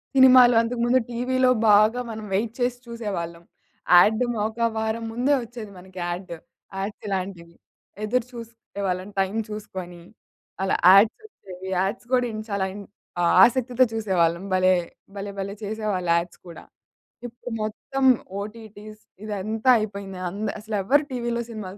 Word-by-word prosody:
సినిమాలు, 255 -2 +8
అంతకు 235 +1 -3
ముందు 250 +2 +4
టీవీలో 255 +2 +1 0.2
బాగా 215 +4 +5
మనం 220 -1 -6
వెయిట్ 220 +3 0
చేసి 245 0 0
చూసేవాళ్ళం. 185 -8 -5 0.5
యాడ్డేమో 220 +4 +3
ఒక 230 +1 0
వారం 220 +1 -2
ముందే 250 +5 +1
ఒచ్చేది 230 -3 -9
మనకి 185 +1 -15
యాడ్డు. 175 0 -5 0.4
యాడ్సిలాంటివి. 190 -4 -5 0.5
ఎదురు 235 +2 0
చూస్తుండే 230 -3 -9
వాళ్ళం 185 +2 -3
టైం 195 +2 0
చూసుకొని. 185 -4 -7 0.6
అలా 195 - +1 0.2
యాడ్సొచ్చేవి, 195 - +1
యాడ్స్ 195 +6 -1
గూడా 250 -1 +2
ఇన్ 215 0 -5
చాలా 200 -1 -1
ఇన్ 205 0 -8 0.6
ఆసక్తితో 250 +1 +3
చూసేవాళ్ళం. 185 -4 0
భలే! 185 0 +4 0.4
భలే 200 0 -5
భలే! 200 +1 -4
చేసేవాళ్ళు 205 -5 -2
యాడ్స్ 170 +1 -2
కూడా. 170 - -11 0.6
ఇప్పుడు 240 +1 -10
మొత్తం 265 +5 -3 0.4
ఓటీటీస్ 215 0 -10 0.2
ఇదంతా 215 +4 -2
అయిపోయింది 200 -3 -6
అంద్ 205 +3 -3
అసలెవ్వరు 220 +7 +1
టీవీలో 235 -1 -2
సినిమాలు 205 -3 -7
215 Hz, 125 wpm, -24 LUFS, 190-235 Hz, 0.6 s, సినిమాలు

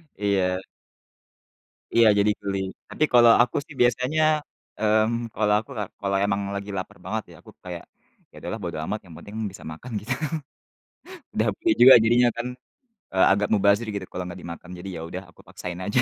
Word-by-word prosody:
Iya. 95 -2 +1 1.4
Iya, 115 -1 +7
jadi 105 +1 +4
geli. 100 -1 -2 0.3
Tapi, 155 - -1
kalau 120 -1 +8
aku 125 - +1
sih 145 - -13
biasanya, 125 +5 +2 0.6
mmm, 110 +2 +1
kalau 105 -1 +2
aku 110 - -11
ka 105 - -1 0.2
kalau 100 0 0
emang 100 0 0
lagi 100 +1 -5
lapar 95 - -6
banget - - -2
ya, - - -13
aku - - -15
kayak 90 -2 -7 0.5
"Ya - - -21
udahlah - - -4
bodo - - -4
amat 105 +7 -3
yang 85 -3 -13
penting 105 +1 -11 0.2
bisa - - -12
makan," 120 +11 -9
gitu. 115 +5 -2 1.2
Udah - - +1
pulih 340 - +2
juga 130 +2 +11
jadinya 120 +2 +5
kan, 120 +1 -3 0.7
eee, 95 - +5
agak 100 +1 +2
mubazir 105 +2 +3
gitu 100 -3 -4
kalau 90 - -4
gak 90 - -8
dimakan. 85 +1 -9
Jadi, 95 +2 -7
ya 80 - -6
udah, 90 +2 -6
aku - - -19
paksain 90 0 -7
aja. 115 +4 +2
105 Hz, 180 wpm, -25 LUFS, 95-115 Hz, 1.4 s, juga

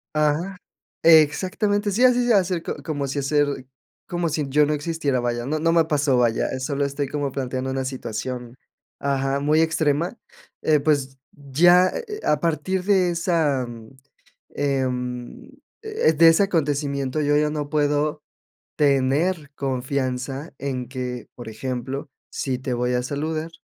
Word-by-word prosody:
ajá. 155 +5 +1 0.4
Exactamente, 190 +6 +3
sí, 235 +6 +1
así 245 -1 +5
se 235 - +4
acercó, 180 -3 +1
como 145 -4 -3
si 140 +2 -2
hacer 145 -1 0 0.4
como 175 -1 -1
si 150 -1 -1
yo 150 +2 +4
no 150 - 0
existiera, 145 -3 -1
vaya. 120 0 -2
No 155 +3 -1
no 165 +1 +2
me 165 -1 +4
pasó, 145 -4 +1
vaya, 120 -2 +2
eh, 130 - -4
solo 140 +1 -1
estoy 140 0 -2
como 145 -1 -2
planteando 130 0 -3
una 135 0 -2
situación, 125 -1 -5 0.4
ajá, 140 0 0
muy 150 +3 +3
extrema. 160 - 0 0.4
Eh, 155 -2 +3
pues, 140 -3 0
ya, 175 +6 +4
eh 475 - -4
eh 425 0 -6
a 150 - +2
partir 170 +3 -1
de 190 -3 +3
esa 165 -6 +1
mm, 115 -2 -10 0.7
em, 125 - -2 0.3
eh 435 - +1
de 165 +2 +7
ese 165 +5 +5
acontecimiento, 145 -5 -1
yo 145 0 +2
ya 150 0 +2
no 150 -1 -3
puedo 150 0 0 0.5
tener 145 +3 +1
confianza 135 +1 -3
en 130 -2 -3
que, 125 -2 -5
por 120 -2 -9
ejemplo, 130 +5 -5 0.2
si 130 -2 -2
te 130 -1 -3
voy 125 +1 0
a 125 0 +1
saludar, 155 +4 -3
145 Hz, 150 wpm, -23 LUFS, 130-160 Hz, 0.7 s, de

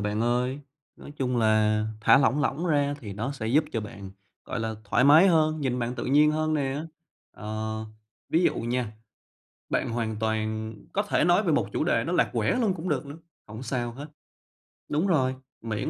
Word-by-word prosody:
bạn 105 +1 -1
ơi. 125 +4 0 0.4
Nói - - -11
chung 125 -3 -1
là 110 -1 +2
thả 135 - +6
lỏng 140 +1 +2
lỏng 150 +4 -1
ra 145 -3 +1
thì 105 -4 -7
nó 115 +8 -3
sẽ 120 -6 -5
giúp 145 +7 +3
cho 115 - -1
bạn, 105 -3 -9 0.3
gọi 125 - -4
là, 110 0 -2
thoải 120 +5 +2
mái 155 +6 +8
hơn, 155 -2 +2
nhìn 130 -3 -1
bạn 120 0 -2
tự - - -5
nhiên 150 +3 +4
hơn 155 0 0
nè. 140 0 -1 0.5
Ờ, 110 +1 -4 0.5
ví 165 - +3
dụ - - +3
nha, 120 -1 -2 0.8
bạn - - 0
hoàn 115 -2 -2
toàn 110 0 -2 0.2
có 205 - +1
thể 205 - +1
nói 175 +3 +4
về 175 -6 +1
một - - +1
chủ - - 0
đề - - +1
nó - - -2
lạc - - +2
quẻ - - +1
luôn 210 -6 +2
cũng 175 +1 -5
được 150 -3 -1
nữa, 140 +2 -8 0.3
hổng 110 +4 -9
sao 120 -1 -2
hết. 140 +5 -8 0.8
Đúng 155 +6 +1
rồi, 130 -7 +2 0.3
miễn 110 -2 -3
125 Hz, 200 wpm, -26 LUFS, 110-150 Hz, 0.8 s, mái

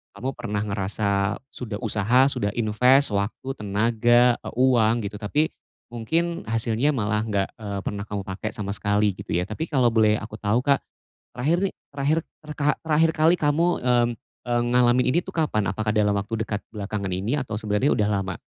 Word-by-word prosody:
kamu 130 +2 -3
pernah 105 -4 -3
ngerasa 100 0 -1
sudah 115 -4 -6
usaha, 115 +5 +3
sudah 100 - -1
invest, 125 +5 +4
waktu, 100 +5 -2
tenaga, 120 +3 +3
atau - - -7 0.2
uang 115 0 +2
gitu, 105 +1 -5
tapi 150 +9 0 0.4
mungkin 165 +9 -2
hasilnya 115 +5 0
malah 105 -2 0
gak, 100 -3 0
eee, 100 -2 -4
pernah 100 -1 -4
kamu 100 -1 -4
pakai 95 +3 -5
sama 100 -1 -4
sekali 105 0 +1
gitu 95 - -5
ya. 90 - +1
Tapi 110 - -5
kalau 130 -5 +2
boleh 110 -1 +4
aku 110 0 -7
tau 110 +4 +1
Kak, 140 -1 +3 0.6
terakhir 150 +8 +1
nih, 195 - -1 0.2
terakhir 145 +3 0 0.3
terkha 150 -1 0
terakhir 160 0 +3
kali 160 +2 +4
kamu, 155 +1 +1 0.2
mmm, 120 -1 +3 0.4
eee, 120 0 +1
ngalamin 125 0 +4
ini 170 - +3
tuh - - -10
kapan? 130 - 0
Apakah 110 +1 -1
dalam 105 -1 +2
waktu 110 +2 -2
dekat 105 -1 -3
belakangan 100 -2 -4
ini 100 +9 -1
atau 115 -6 -4
sebenarnya 105 +5 +1
udah 105 -1 +1
lama? 95 -3 -2
110 Hz, 175 wpm, -24 LUFS, 105-130 Hz, 0.6 s, invest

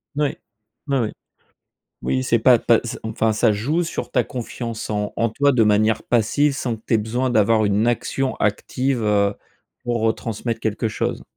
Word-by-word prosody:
Oui. 145 -1 0 0.5
Oui, 140 -1 +1
oui. 110 -2 -1 0.9
Oui, 130 - 0
c'est 120 -2 +2
pas 120 +2 +5
pas 115 0 +3
s 120 - -5
enfin, 110 0 0
ça 110 +1 +3
joue 140 +12 0
sur 165 - -5
ta 125 -3 +2
confiance 115 -2 -5
en 105 -1 -2
en 115 - +1
toi 140 +6 +2
de 120 -3 +3
manière 105 +1 +2
passive 135 +5 +2
sans 120 -4 -2
que 110 - -21
tu - - +1
ai 110 - +4
besoin 120 +5 -1
d'avoir 110 0 +3
une 105 +3 +1
action 130 +2 -1
active, 125 +4 -1
heu, 100 -1 +2 0.5
pour, 120 -2 0
heu, 110 - +3
transmettre 115 0 -4
quelque 110 0 -1
chose. 110 - -3
115 Hz, 185 wpm, -21 LUFS, 110-125 Hz, 0.9 s, pas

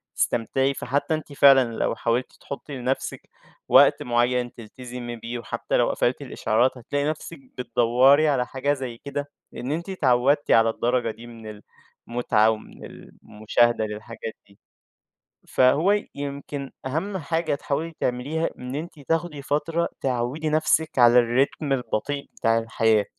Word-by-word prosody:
تستمتعي، 135 +4 +1
فحتى 140 +5 -1
أنتِ 155 -2 -4
فعلًا 135 -4 +6
لو - - 0
حاولتِ 120 +2 -1
تحطي 140 0 -7
لنَفْسِك 130 +2 -3 0.4
وقت - - +6
معين 120 0 +1
تلتزمي 120 +1 -8
بيه، 120 +1 -6
وحتى - - -2
لو - - +3
قفلتِ - - 0
الإشعارات 125 +4 0
هتلاقي 140 +4 -2
نَفْسِك 155 +1 -6 0.2
بتدَوري 125 +5 +4
على 130 -4 +2
حاجة 140 +3 -1
زَي 130 -4 -5
كده، 145 +2 -5 0.2
لإن 130 +3 -5
أنتِ 170 +5 -3
اتعودتِ 140 -4 +2
على 115 0 +5
الدرجة 120 0 0
دي 115 +2 -12
من 110 -3 -10 0.5
المتعة 115 -2 +2
ومن 110 -1 -6
المشاهدة 110 +1 -1
للحاجات 110 +1 -7
دي. 100 - -23 0.9
فهو 155 +11 +3
يمْكِن 140 0 -5 0.2
أهم 190 +9 -2
حاجة 165 0 -1
تحاولي 150 +4 -3
تعمليها 140 +7 -1
إن 125 +1 -6
أنتِ 160 +1 -6
تاخدي 160 0 -2
فترة 160 +4 0
تعوّدي 130 +5 -1
نَفْسك 155 -1 +1
على 120 0 +7 0.2
الrhythm 140 -1 -5
البطيء 135 +3 -2
بتاع 115 0 +2
الحياة. 110 -2 +2
130 Hz, 135 wpm, -24 LUFS, 120-145 Hz, 0.9 s, على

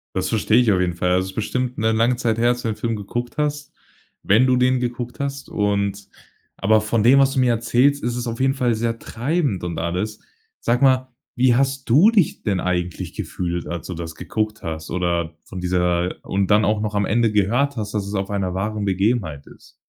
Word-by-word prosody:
Das 95 0 -1
verstehe 110 +1 +3
ich 120 -4 +3
auf 95 - +2
jeden 90 -1 0
Fall. 90 +1 -1
Also, 95 +1 +1
ist - - -10
bestimmt 125 +3 -2
'ne 110 +1 +2
lange 115 +2 +2
Zeit 115 -3 0
her, 120 +1 +3
als 120 0 0
du - - -3
den 110 - -2
Film 115 +1 -2
geguckt 120 +4 -5
hast 150 -1 -2 0.5
wenn 115 +6 +4
du 130 - +4
den 125 +1 +2
geguckt 120 0 -4
hast 140 0 -4
und 100 -1 -1 0.5
aber 110 +2 +3
von 110 0 0
dem, 130 +4 +6
was 135 0 +3
du 135 - +2
mir 125 - +3
erzählst, 120 +5 +2
ist 120 0 -2
es 120 0 -3
auf 115 -1 -4
jeden 135 +1 +2
Fall 125 -3 +1
sehr 115 +1 -1
treibend 125 - -2
und 85 -1 -4
alles. 90 +6 -3 0.4
Sag 120 +2 +1
mal, 130 -1 +3 0.3
wie 125 -1 +4
hast 135 0 0
du 155 - +6
dich 205 -8 +1
denn 95 -5 -1
eigentlich 90 -1 -2
gefühlt, 85 -1 -4
als 85 -2 -5
du 95 - -5
das 80 -1 -6
geguckt 110 +4 -3
hast 80 -2 -5
oder 85 -2 -1
von 95 - -8
dieser 90 0 0
und 95 0 -1
dann 105 +1 +4
auch 105 +2 +1
noch 105 0 -3
am 100 -1 +1
Ende 110 +2 +1
gehört 120 +8 +1
hast, 105 -3 -4
dass 100 -2 -2
es 100 - -6
auf 95 0 -2
einer 100 -3 -2
wahren 105 +2 -2
Begebenheit 95 - 0
ist? - - -18
110 Hz, 220 wpm, -21 LUFS, 95-125 Hz, 0.5 s, dem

